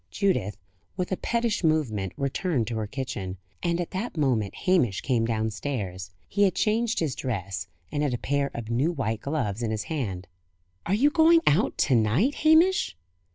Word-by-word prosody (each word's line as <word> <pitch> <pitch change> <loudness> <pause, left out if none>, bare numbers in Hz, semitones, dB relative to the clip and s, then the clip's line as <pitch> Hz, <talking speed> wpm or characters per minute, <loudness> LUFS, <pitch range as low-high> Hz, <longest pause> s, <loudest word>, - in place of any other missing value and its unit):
Judith, 185 - 0 0.4
with 180 +1 -2
a - - +2
pettish 235 -4 -1
movement, 125 - +1
returned 140 - 0
to 115 0 -3
her 110 -1 -2
kitchen; 100 -7 -5 0.2
and 170 -1 0
at 175 - -3
that 190 0 -4
moment 125 -9 +1
Hamish 165 - +3
came 120 -4 +1
downstairs. 110 -4 -3 0.2
He 200 - -1
had 195 -4 +4
changed 225 +2 +1
his 155 -5 0
dress, 100 -6 -4 0.2
and 145 - -1
had 145 -3 +1
a - - -3
pair 140 +2 0
of 115 -1 -5
new 135 +8 +2
white 115 -8 -2
gloves 125 -8 -2
in 115 - -1
his 110 -1 -2
hand. 95 - -3 0.6
"Are 190 - +2
you 285 +7 +4
going 330 +1 +6
out 165 +9 +3
to 135 - +2
night, 120 - +3
Hamish?" 315 - +4
140 Hz, 175 wpm, -26 LUFS, -, 0.6 s, going